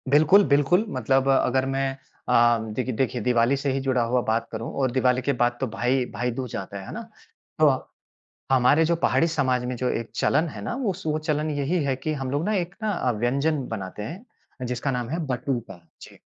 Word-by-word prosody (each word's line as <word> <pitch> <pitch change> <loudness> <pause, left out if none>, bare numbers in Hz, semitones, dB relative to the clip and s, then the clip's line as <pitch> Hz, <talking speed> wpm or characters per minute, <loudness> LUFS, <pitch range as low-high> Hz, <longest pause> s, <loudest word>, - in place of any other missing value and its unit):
बिल्कुल, 155 +8 +6
बिल्कुल। 145 +8 +3
मतलब 130 +2 +1
अगर 130 -1 +2
मैं 135 0 0 0.4
अम, 120 -2 +4
देखि 130 +3 -2
देखिए 125 +1 -1
दिवाली 120 +3 +3
से 140 0 -1
ही 135 - 0
जुड़ा 130 -2 +1
हुआ 125 0 +2
बात 115 +1 0
करूँ 115 +1 -5
और 130 -2 +1
दिवाली 125 0 +2
के 140 +3 0
बाद 120 0 +1
तो 130 - +1
भाई 125 +3 0
भाईदूज 125 0 -3
जाता 100 +1 -5
है, 95 - -9
है - - -8
ना। - - -5 0.6
तो - - +6 0.9
हमारे 135 +5 +5
जो 170 +1 +2
पहाड़ी 165 0 +2
समाज 130 -6 0
में 125 0 -3
जो 125 +1 -1
एक 115 -2 -3
चलन 155 +4 +2
है 110 -8 -8
ना 100 - -3
वो 240 -7 -1
स 185 - -11
वो 155 0 0
चलन 155 0 -1
यही 145 +4 0
है 135 -2 0
कि 145 +4 -3
हम 135 -3 -4
लोग 145 +3 0
ना 215 - 0
एक 180 0 -2
ना 215 - +1
अ, 130 -10 0
व्यंजन 135 +6 0
बनाते 105 -1 -6
हैं, 175 - -10
जिसका 125 +3 -2
नाम 125 -2 -3
है 165 +4 -2
बटुका। 120 -6 -3 0.2
जी। - - -13
130 Hz, 215 wpm, -25 LUFS, 120-150 Hz, 0.9 s, बिल्कुल